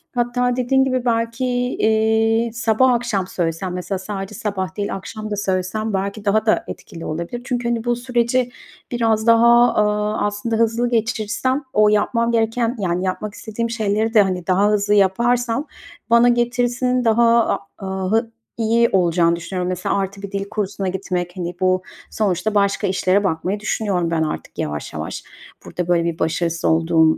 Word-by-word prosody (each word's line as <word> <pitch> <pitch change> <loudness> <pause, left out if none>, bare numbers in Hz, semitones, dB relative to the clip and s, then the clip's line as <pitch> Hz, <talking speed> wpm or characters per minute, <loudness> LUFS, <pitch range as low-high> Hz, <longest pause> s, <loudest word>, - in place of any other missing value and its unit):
Hatta 245 0 0
dediğin 260 +2 +2
gibi 255 -2 -1
belki, 230 +2 0
eee, 225 -2 +1
sabah, 235 +2 +3
akşam 230 -6 -1
söylesem, 175 +1 -2
mesela 180 +1 -3
sadece 195 +1 -6
sabah 190 -2 -4
değil 205 -1 -2
akşam 215 +3 -7
da 205 - 0
söylesem 200 +2 -2
belki 200 +2 -3
daha 215 +2 +2
da 220 - +2
etkili 165 -1 -9
olabilir. 170 +10 -4
Çünkü, 245 -2 -2
hani, 235 -1 -1
bu 240 -1 +1
süreci 245 0 0 0.4
biraz 225 -2 +1
daha, 235 +1 +6
aaa, 210 0 +1
aslında 210 +3 -2
hızlı 230 +2 +1
geçirsem 230 +4 -1
o 210 0 +5
yapmam 230 +3 +1
gereken, 230 +1 0
yani, 180 -2 -1
yapmak 205 +3 -3
istediğim 230 +1 -4
şeyleri 220 0 0
de, 215 - +7
hani, 185 -2 -1
daha 190 +2 +3
hızlı 210 0 +1
yaparsam 235 +7 +2 0.4
bana 235 +1 +6
getirisinin 245 +1 +1
daha, 230 +1 +4
a - - 0 0.2
aaa, 190 -1 -4
hı 225 +1 +1 0.3
iyi 230 +1 +3
olacağını 170 -2 +3
düşünüyorum. 180 +2 -4
Mesela 185 +2 -1
artı 195 0 -3
bir 200 - -7
dil 200 0 -4
kursuna 200 -2 -3
gitmek, 180 -1 -3
hani, 175 -1 -4
bu 185 0 +2 0.3
sonuçta 210 0 -1
başka 200 -1 +2
işlere 190 +1 +2
bakmayı 185 +3 -1
düşünüyorum 195 -5 -1
ben 160 -1 +1
artık 155 - -5
yavaş 75 0 -4
yavaş. 80 +1 -5 0.4
Burada, 180 -1 -4
böyle, 175 -1 +2
bir 170 -1 -3
başarısız 165 +1 -1
olduğum 160 0 +3
210 Hz, 160 wpm, -20 LUFS, 185-235 Hz, 0.4 s, de